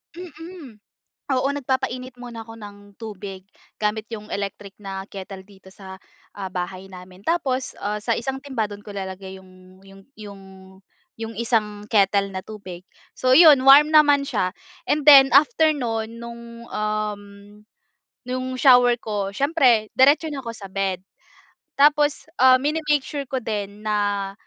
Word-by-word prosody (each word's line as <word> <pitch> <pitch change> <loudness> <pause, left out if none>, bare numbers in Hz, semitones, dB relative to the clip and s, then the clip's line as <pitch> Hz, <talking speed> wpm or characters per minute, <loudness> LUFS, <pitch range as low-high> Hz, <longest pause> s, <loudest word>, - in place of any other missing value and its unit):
Mm. 330 - -11 0.6
Oo, 260 +1 +1
nagpapainit 260 -2 -3
muna 235 -2 -8
ako 225 - -11
ng 205 -2 -10 0.3
tubig 195 -3 -8 0.4
gamit 215 +1 -1
yung 210 -1 -8
electric 200 0 -6
na 195 -2 -7
kettle 195 0 -9
dito 190 -1 -18
sa, 190 -1 -11 0.4
ah, 195 -2 -5
bahay 185 +1 -5
namin. 185 0 -13
Tapos, 265 -6 -1
ah, 210 +1 -2
sa 225 +3 -1
isang 265 +4 -3
timba, 260 -7 -3
do'n 205 0 -10
ko 205 - -9
ilalagay 190 -1 -7
yung 185 0 -19
yung 195 0 -16
yung 200 -2 -11 0.8
yung 225 0 -6
isang 210 -3 -1
kettle 200 -1 +2
na 190 -1 -6
tubig. 185 -4 -10 0.3
So 255 0 +2
yun, 300 -3 +7
warm 285 +3 +8
naman 295 -2 +5
siya, 185 -7 -1 0.3
and 300 - 0
then 275 -2 +9
after 310 - +4
no'n 225 -5 -3
nung, 235 0 -10
um, 210 -1 -3 1.0
nung 255 +1 -4
shower 245 -2 +5
ko, 205 -4 -4
siyempre 260 -7 +2
diretso 285 +5 +4
na 280 - -5
ako 235 - -8
sa 205 - -10
bed. 190 -1 -2 0.8
Tapos, 295 +1 +3 0.2
ah, 255 0 +7
mini-make 295 +1 0
sure 280 -3 -6
ko 265 - -3
din 210 -2 -5
na, 205 -2 -1
220 Hz, 145 wpm, -22 LUFS, 200-265 Hz, 1.0 s, then